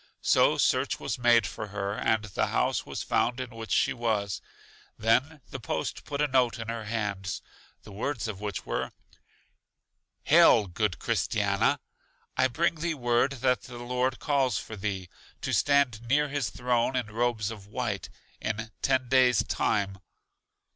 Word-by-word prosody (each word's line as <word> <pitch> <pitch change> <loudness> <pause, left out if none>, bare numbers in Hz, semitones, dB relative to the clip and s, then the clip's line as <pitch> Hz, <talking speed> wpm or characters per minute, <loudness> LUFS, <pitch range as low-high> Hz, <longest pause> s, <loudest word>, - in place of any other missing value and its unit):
So - - +4
search - - +2
was - - -3
made 120 -3 +5
for 105 - -5
her, 100 0 -3
and 110 +1 +1
the 105 -3 -1
house - - 0
was - - -4
found 120 +2 +1
in 130 -1 -5
which 115 -1 -8
she - - +2
was. 105 -5 -1 0.6
Then 125 +7 +1
the - - -5
post - - -3
put 145 0 -1
a - - +3
note 130 -3 +2
in 115 -1 -6
her 115 -1 -4
hands, 100 -4 -3 0.4
the - - -12
words 115 +4 -3
of 105 -2 -6
which 105 -1 -4
were: - - -3 1.3
Hail, 155 -9 +6
good 95 0 -1
Christiana! - - +1 0.6
I 130 0 +4
bring 165 +6 0
thee 165 0 -1
word 120 +1 +2
that 125 -1 +3
the 120 -2 -10
Lord 125 +1 -1
calls 140 -4 +1
for 110 - -6
thee, 95 -2 -3 0.3
to - - -2
stand 140 -6 +3
near 145 +5 +1
His 140 -4 -1
throne 125 +1 0
in 125 -2 0
robes 115 -2 0
of 100 -3 -10
white, 105 -2 -3 0.3
in 110 +1 -3
ten 130 -2 +1
days' 125 -1 +4
time. 95 -1 0
120 Hz, 160 wpm, -28 LUFS, 105-130 Hz, 1.3 s, Hail